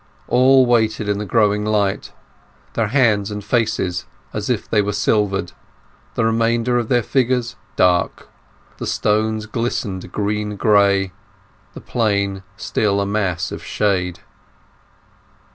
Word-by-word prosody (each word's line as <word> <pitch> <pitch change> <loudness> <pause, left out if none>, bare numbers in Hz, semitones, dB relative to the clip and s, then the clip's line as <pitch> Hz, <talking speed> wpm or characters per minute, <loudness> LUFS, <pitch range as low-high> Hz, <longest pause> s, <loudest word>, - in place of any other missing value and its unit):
All 130 +1 +5
waited 110 -3 +1
in 105 0 0
the 105 - -4
growing 105 0 +2
light, 105 -2 0 0.6
their 115 -2 0
faces 110 -5 +2
and 105 0 -5
hands 100 -5 0 0.3
as - - -3
if - - -1
they 105 - +2
were 105 0 -2
silvered, 100 -3 0 0.6
the 115 - +1
remainder 115 +2 +1
of 120 - -3
their 120 -2 +3
figures 125 -1 0 0.2
dark, 90 -1 +1 0.5
the - - -5
stones 110 0 0
glistening 115 -4 -2
green 105 0 -2
gray, 100 -2 +3 0.6
the - - -8
Plain 100 -4 0 0.2
still 100 0 0
a 100 - 0
mass 95 -5 -1
of - - -7
shade. 90 -4 -1
105 Hz, 125 wpm, -20 LUFS, 100-115 Hz, 0.6 s, All